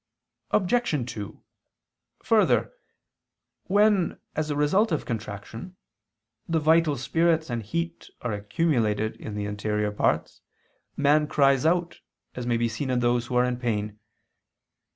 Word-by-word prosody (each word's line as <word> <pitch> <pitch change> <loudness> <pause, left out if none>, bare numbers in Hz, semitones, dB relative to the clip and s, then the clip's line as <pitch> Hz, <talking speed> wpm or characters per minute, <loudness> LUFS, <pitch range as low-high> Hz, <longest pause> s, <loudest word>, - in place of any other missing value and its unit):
Obj. 180 - +1
2: 105 -3 -8 0.8
Further, 220 - +3 0.9
when, 205 -2 +2 0.2
as 155 0 -1
a 145 - -1
result 175 +9 +2
of 155 - -1
contraction, 110 - -6 0.7
the 165 - +2
vital 160 -1 +3
spirits 160 +3 +1
and 115 -1 -2
heat 170 +10 -4
are 120 -3 -1
accumulated 110 0 0
in 110 - -7
the 105 0 -3
interior 105 0 -1
parts, 105 - -1 0.6
man 150 +1 +3
cries 140 -1 +3
out, 175 +1 0 0.3
as 125 -1 -5
may 120 -1 +2
be 120 0 +1
seen 115 +5 -4
in 125 -1 +1
those 120 0 +1
who 125 - -4
are 125 0 +4
in 125 -1 -1
pain. 105 -4 -2
130 Hz, 130 wpm, -26 LUFS, 110-165 Hz, 0.9 s, are